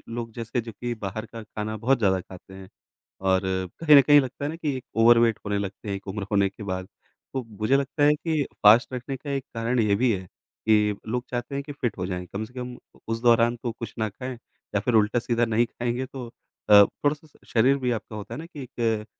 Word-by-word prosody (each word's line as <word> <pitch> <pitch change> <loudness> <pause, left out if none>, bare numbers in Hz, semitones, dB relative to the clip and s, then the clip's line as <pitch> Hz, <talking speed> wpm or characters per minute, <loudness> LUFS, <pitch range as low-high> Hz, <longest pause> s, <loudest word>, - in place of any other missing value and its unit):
लोग 115 -1 -4
जैसे 115 -1 -6
कि - - 0
जो 115 - -6
कि 120 +3 -4
बाहर 110 +2 -5
का 115 0 -9
खाना 110 +1 -5
बहुत 130 +5 +2
ज़्यादा 95 -3 +3
खाते 95 +1 -13
हैं 95 -1 -10 0.5
और 95 -1 +2 0.4
कहीं 150 -3 +7
न - - +11
कहीं 145 +1 +7
लगता 130 +2 -5
है - - 0
ना 165 - -6
कि 150 -5 -2
एक 130 - -7
ओवरवेट 115 -1 +5
होने 100 0 0
लगते 100 +1 -5
हैं, 100 - -1
एक 100 - -11
उम्र 100 +1 -4
होने 100 -1 +3
के 100 - -12
बाद। 95 -1 -4 0.5
तो 130 - -1 0.2
मुझे 125 +6 +3
लगता 140 +2 -1
है 150 +1 +6
कि 155 -1 -1 0.2
फ़ास्ट 110 +5 +6
रखने 130 +2 -4
का 140 +2 -8
एक 135 -1 -2
कारण 115 +2 0
ये 105 -2 +3
भी 120 +2 +2
है, 95 -2 -3 0.4
कि 105 -2 +3
लोग 125 +2 -2
चाहते 120 +3 -4
हैं 140 - -2
कि 145 - -7
फिट 125 -6 -3
हो 90 - -2
जाएँ। 90 -1 -4
कम 105 +2 -3
से 125 +4 -14
कम 125 -1 -6 0.3
उस 115 0 -2
दौरान 120 0 +4
तो 120 -2 -2
कुछ 115 - -6
ना 110 -1 0
खाएँ 125 +5 -6 0.4
या 100 - +2
फिर 120 +2 -1
उल्टा-सीधा 115 +2 +2
नहीं 115 +1 +2
खाएँगे 120 +2 -3
तो 125 -2 -8 0.4
अ, 100 -1 +10
थोड़ा-सा 150 +4 -3
शरीर 130 +4 +4
भी 125 - +2
आपका 110 -1 -4
होता 105 -1 -7
है - - -6
ना 165 - -7
कि 150 -5 -9
एक 115 -3 -2
115 Hz, 240 wpm, -25 LUFS, 105-130 Hz, 0.5 s, न